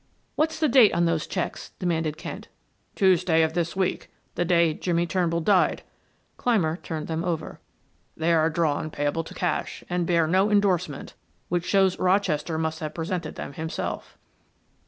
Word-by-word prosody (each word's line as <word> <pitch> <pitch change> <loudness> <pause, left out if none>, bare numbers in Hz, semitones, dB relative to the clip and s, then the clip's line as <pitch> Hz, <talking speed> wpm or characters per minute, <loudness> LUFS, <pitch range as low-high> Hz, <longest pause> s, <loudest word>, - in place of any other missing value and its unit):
"What's 315 +1 0
the 310 - +3
date 245 -5 +6
on 170 - +3
those 165 -2 0
checks?" 185 - -4
demanded 160 -4 -1
Kent. - - -7 0.5
"Tuesday 180 -4 +3
of 160 0 0
this 170 0 -1
week 190 -1 -1 0.2
the - - 0
day 170 -2 +3
Jimmie 170 +1 0
Turnbull 170 -1 0
died." 185 +2 +2 0.5
Clymer 180 -10 +1
turned 160 -4 -5
them 160 0 -3
over. 170 -3 -3 0.6
"They 165 +1 +2
are 160 0 +3
drawn 155 -2 0
payable 145 +2 -1
to - - -11
cash, 175 -4 -2
and 175 -1 0
bear 170 -2 +3
no 190 +5 +2
endorsement, 190 -8 0 0.4
which 175 0 -1
shows 190 -2 +3
Rochester 180 -4 +1
must 160 0 -2
have 155 -1 -5
presented 165 -1 -3
them - - -6
himself." 160 +3 -5
170 Hz, 155 wpm, -25 LUFS, 160-185 Hz, 0.6 s, date